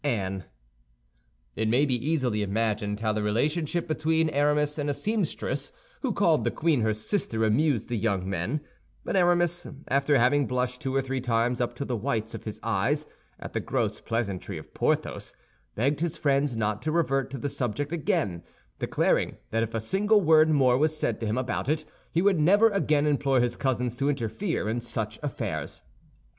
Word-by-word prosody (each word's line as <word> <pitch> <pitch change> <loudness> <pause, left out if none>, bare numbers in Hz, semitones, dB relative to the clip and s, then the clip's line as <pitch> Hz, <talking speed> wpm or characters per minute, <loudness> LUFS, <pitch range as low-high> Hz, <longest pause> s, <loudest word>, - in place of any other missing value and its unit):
"ANNE" 95 - -1 1.1
It 110 - 0
may 125 +6 +4
be 135 - +1
easily 125 -4 0
imagined 105 0 -1
how 110 -1 +1
the 105 - -1
relationship 150 +11 0
between 160 0 +1
Aramis 150 +1 +1
and 145 0 -1
a 145 - 0
seamstress 210 -1 -2 0.3
who 260 - 0
called 170 -6 +3
the - - +2
queen 155 -6 +1
her 110 0 +2
sister 110 - -1
amused 120 +1 +2
the 120 -3 -2
young 100 -3 0
men; 100 - -2 0.4
but - - -2
Aramis, 175 -1 +2 0.2
after 140 +1 +3
having 130 +3 +3
blushed 125 0 -1
two 135 -2 -2
or 135 - +2
three 135 0 -2
times 120 0 +1
up 120 0 -1
to 140 - -4
the 125 - -2
whites 110 -1 -2
of 115 -1 -8
his 110 - -6
eyes 115 +8 0 0.3
at - - -8
the - - 0
gross - - -1
pleasantry 110 -5 -3
of - - -11
Porthos, - - -1 0.4
begged 140 +6 +1
his 170 0 -1
friends 140 -4 +1
not 105 0 -1
to 155 - -1
revert 135 -5 +1
to 135 - -5
the 140 - -3
subject 140 +2 -2
again, 100 - -1 0.4
declaring - - +1
that 115 +1 +1
if 115 0 -2
a - - +1
single 205 - +2
word 160 -2 +5
more 130 -4 +4
was 155 +1 +2
said 115 -7 -1
to 115 - -3
him 110 +3 -1
about 130 +1 -2
it, 155 0 0 0.3
he 170 - +1
would 195 -4 +3
never 205 +8 +5
again 155 -7 +2
implore 140 -3 +2
his 120 0 +1
cousins 125 -2 -1
to 140 +2 +1
interfere 135 - -2
in 115 +2 -1
such 110 -2 -4
affairs. 145 -3 -4
135 Hz, 185 wpm, -27 LUFS, 115-155 Hz, 1.1 s, word